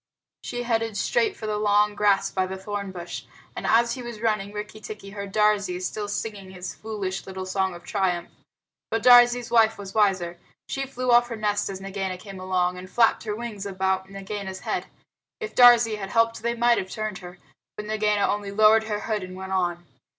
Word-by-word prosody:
She 245 0 -4
headed 225 -3 -1
straight 450 -4 +1
for 220 - -7
the 210 -1 -1
long 210 0 +3
grass 200 -1 +2
by 185 -1 0
the 190 +1 -5
thorn 200 0 -5
bush, 175 -2 -7 0.3
and - - -4
as 235 +1 +4
he 255 - -6
was 240 -3 -7
running 215 -3 0
Rikki 210 +1 -7
tikki 210 -2 -8
heard 200 -1 -6
Darzee 205 -3 +2
still 205 +3 -3
singing 205 -2 -4
his 185 -1 -7
foolish 200 -4 -5
little 190 -1 -5
song 190 -1 -1
of 175 - -12
triumph. 180 -3 -1 0.6
But 225 -1 -1
Darzee's 245 -1 +6
wife 225 -1 +4
was 195 -1 -8
wiser. 185 -5 +1 0.3
She 270 0 -3
flew 255 -1 -1
off 240 0 +6
her 235 - -5
nest 210 -2 -1
as 190 -1 -5
Nagaina 195 -1 -4
came 195 0 -10
along, 180 -1 0
and 185 0 -10
flapped 230 +1 +3
her 210 -1 -2
wings 215 -3 -5
about 190 0 -1
Nagaina's 195 -1 -6
head. - - -3 0.5
If 435 -1 -5
Darzee 240 -3 +7
had 195 -2 -6
helped 230 +1 +2
they 235 +1 -1
might 235 0 +3
have 190 - -5
turned 215 -1 -4
her, 180 -1 -11 0.4
but 210 - -5
Nagaina 210 -1 +1
only 205 -1 -2
lowered 215 +2 +5
her 210 -1 -3
hood 215 -2 -2
and 185 0 -8
went 190 0 -7
on. 175 -2 -1
205 Hz, 200 wpm, -25 LUFS, 190-225 Hz, 0.6 s, Darzee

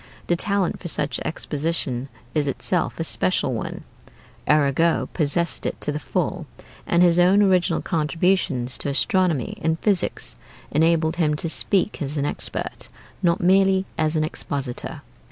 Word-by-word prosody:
The 175 - +1
talent 200 0 0
for 175 - -6
such 150 -3 0
exposition 145 -5 -2 0.2
is 150 -2 +1
itself 135 - -1
a - - 0
special - - 0
one. - - -5 0.7
Arago 150 +2 +3
possessed 170 +1 0
it - - -4
to - - 0
the 150 - -3
full, - - -2 0.4
and 170 +1 +4
his 175 0 +5
own 190 +4 +5
original 185 -3 +2
contributions 160 -6 0
to - - -1
astronomy 160 - +1
and 160 0 +1
physics 200 0 0 0.4
enabled 160 +1 +2
him 155 -3 +2
to 160 - +1
speak 190 +3 0
as 145 +1 -2
an 140 - 0
expert, - - -3 0.3
not 170 -2 +2
merely 190 +1 +4
as 155 0 0
an 155 - +2
expositor. 140 -4 -4
165 Hz, 145 wpm, -23 LUFS, 145-180 Hz, 0.7 s, his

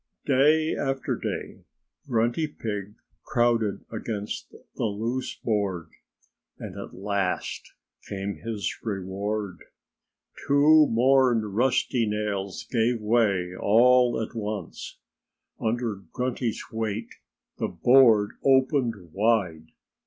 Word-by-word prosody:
Day 150 +4 +3
after 135 -1 -2
day - - -5 0.5
Grunty 120 +5 +1
Pig 105 -7 -5 0.3
crowded 115 -3 +1
against 110 -2 -5 0.3
the - - -1
loose 115 +5 -2
board. 100 -7 -2 0.7
And - - -8
at - - -8
last 100 -1 -2 0.4
came 100 0 -4
his 110 -3 -4
reward. 100 -1 -3 0.9
Two 150 +2 +6
more 130 +1 +4
rusty 115 +2 +1
nails 105 -2 -3
gave 115 0 +1
way 105 -5 +1
all 120 +5 +4
at 110 - -4
once. 105 -2 -5 0.7
Under 115 -1 -1
Grunty's 125 -2 -2
weight 110 0 -3 0.5
the - - 0
board 110 +2 +5
opened 130 - +2
wide. 95 -7 +1
110 Hz, 95 wpm, -26 LUFS, 100-125 Hz, 0.9 s, Two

